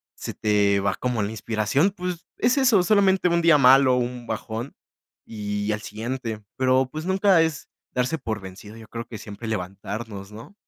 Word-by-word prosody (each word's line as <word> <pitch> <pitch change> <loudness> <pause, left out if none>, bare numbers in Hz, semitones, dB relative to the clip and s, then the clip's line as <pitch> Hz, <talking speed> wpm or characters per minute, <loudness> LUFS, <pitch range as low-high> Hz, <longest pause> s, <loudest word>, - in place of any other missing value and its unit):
se - - -6
te 100 -2 +2
va 100 - +1
como 125 -4 -1
la 100 - -3
inspiración, 110 - +1
pues, 180 -3 -5
es 250 +3 +2
eso 230 -9 +4
solamente 195 -3 +3
un 170 0 +2
día 165 -2 +6
malo, 130 -1 +6
un 125 -1 -3
bajón, 115 +3 -5 0.5
y 105 -1 -3
al 105 0 -2
siguiente, 110 0 -5
pero 130 0 +2
pues, 155 +2 -5
nunca 190 -2 +4
es 160 -2 -2 0.2
darse 130 +6 -1
por 110 -5 -3
vencido, 95 +3 -11
yo 110 - -12
creo 115 0 -6
que 110 - -8
siempre 105 +2 -8
levantarnos, 100 +1 -5
¿no? 115 - -11
120 Hz, 175 wpm, -24 LUFS, 105-160 Hz, 0.5 s, día